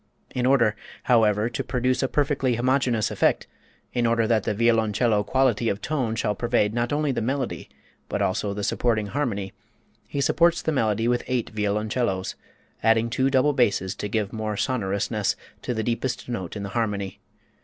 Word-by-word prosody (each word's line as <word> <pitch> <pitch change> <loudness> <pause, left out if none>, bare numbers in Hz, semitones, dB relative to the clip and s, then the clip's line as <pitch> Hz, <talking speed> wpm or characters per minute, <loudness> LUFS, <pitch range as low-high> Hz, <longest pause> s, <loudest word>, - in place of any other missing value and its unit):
In 125 0 0
order, 120 -6 +4 0.3
however, 110 -3 +3
to 120 - -3
produce 125 0 0
a 135 - +1
perfectly 135 -3 +1
homogenous 125 -2 +1
effect, - - +1 0.5
in 120 -1 +1
order 115 0 +2
that 110 -2 +1
the - - 0
violoncello 115 -1 +2
quality 120 -2 +2
of 100 - -2
tone 130 -8 -1
shall 105 -2 0
pervade 115 -1 +1
not 120 0 -1
only 150 0 +1
the 130 - -2
melody, 130 +2 -2 0.4
but - - -2
also 100 +2 0
the 100 +1 -4
supporting 110 0 +1
harmony, 100 -5 -2 0.5
he 140 - -4
supports 170 +4 +3
the 160 - 0
melody 115 -5 +1
with 120 0 +2
eight 125 -3 -1
violoncellos, 105 -1 -1 0.5
adding 115 +1 +3
two 130 +3 +2
double 135 +2 +3
basses 105 -8 +1
to 105 - -3
give 105 -1 -1
more 110 -2 -3
sonorousness 105 -3 0 0.3
to - - -3
the 110 -2 -1
deepest 120 +2 -2
note 95 -8 -4
in 100 - -4
the 100 - -4
harmony. 100 -3 -2
115 Hz, 170 wpm, -25 LUFS, 105-125 Hz, 0.5 s, order